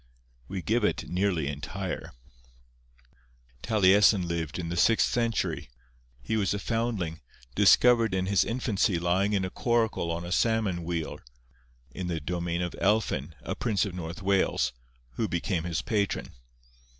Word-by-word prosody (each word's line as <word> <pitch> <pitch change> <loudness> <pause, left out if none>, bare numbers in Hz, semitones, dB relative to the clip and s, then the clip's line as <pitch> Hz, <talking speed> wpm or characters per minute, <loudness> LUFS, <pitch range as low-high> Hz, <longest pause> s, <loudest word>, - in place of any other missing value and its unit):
We 95 -2 -5
give 115 +1 +1
it 105 - 0
nearly 90 -3 0
entire:— 90 +7 -5 1.5
'Taliesin 100 - +4
lived 85 -3 -3
in 85 -2 -4
the 85 - -3
sixth 110 +6 +4
century. 115 - -1 0.5
He 110 - -1
was 100 -1 +1
a - - -1
foundling, 105 -7 -2 0.3
discovered 115 - +5
in 95 0 0
his 100 0 +3
infancy 115 -5 0
lying 90 +4 +1
in 95 -2 +1
a 95 - -5
coracle 115 -7 0
on 85 +1 -3
a 85 - -6
salmon 105 -5 +1
weir, 85 -2 -3 0.7
in 90 +7 -5
the 85 -2 -2
domain 85 +2 -2
of 90 - -4
Elphin, 105 +2 +1
a - - -3
prince 110 -4 0
of 100 - -5
North 85 +1 -6
Wales, 95 -8 +1 0.4
who 110 - 0
became 85 0 -2
his 80 -4 -2
patron. 100 -4 -1
95 Hz, 145 wpm, -28 LUFS, 85-105 Hz, 1.5 s, discovered